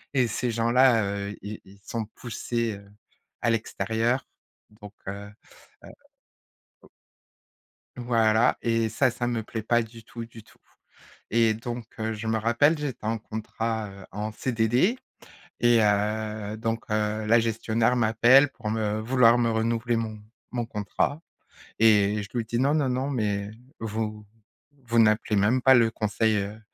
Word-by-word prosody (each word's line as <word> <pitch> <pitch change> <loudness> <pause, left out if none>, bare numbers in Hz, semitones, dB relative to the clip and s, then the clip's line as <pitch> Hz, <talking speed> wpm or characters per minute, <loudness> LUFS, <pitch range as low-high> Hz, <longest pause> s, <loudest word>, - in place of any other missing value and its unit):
et 130 -3 +3
ces 120 +2 -2
gens-là, 115 +1 +3
heu, 100 0 -3
ils 105 +1 -7
ils 100 +1 -17
sont 115 -2 -3
poussés, 115 -1 -3
heu, 100 0 -17 0.5
à 115 - +1
l'extérieur, 115 +3 -1 0.4
donc, 105 -1 -13
heu 100 +1 -6 0.5
heu. - - -11 0.9
v - - -19 1.1
Voilà. 115 -2 +2
Et 115 -1 +1
ça, 130 +3 +2
ça 120 0 -3
me 120 -2 -2
plaît 110 0 -6
pas 120 +2 +2
du 115 0 -10
tout 115 0 -8
du 115 -1 -14
tout. - - -23 0.7
Et 115 -1 +3
donc, 120 0 -6
heu, 110 0 -2
je 110 +1 -6
me 110 0 +1
rappelle 120 +8 +3
j'étais 140 -7 -5
en 115 0 0
contrat, 110 0 -4
heu, 95 -1 -12
en 105 +1 -4
CDD. 125 - +1 0.6
Et, 120 -1 +5
heu, 105 0 0
donc, 115 +1 -3
heu, 105 0 0
la 115 +2 +5
gestionnaire 115 +1 0
m'appelle 120 +4 +5
pour 115 -5 -6
me 110 -1 -1
vouloir 120 0 +4
me 120 -1 +2
renouveler 115 +1 0
mon 110 -2 -4 0.3
mon 120 -2 -2
contrat. 110 +7 -2 0.6
Et 105 -2 +4
je 100 - -10
lui 115 - 0
dis: 115 +1 -2
«Non, 140 +3 +2
non, 145 -4 +1
non, 130 +2 -1
mais 105 -5 -2 0.3
vous 110 -1 -4 0.6
vous 115 -1 +1
n'appelez 110 -1 +3
même 115 +6 +2
pas 130 +1 +6
le 115 -2 +4
conseil, 110 0 0
heu, 100 +2 -4
115 Hz, 155 wpm, -26 LUFS, 105-120 Hz, 1.1 s, pas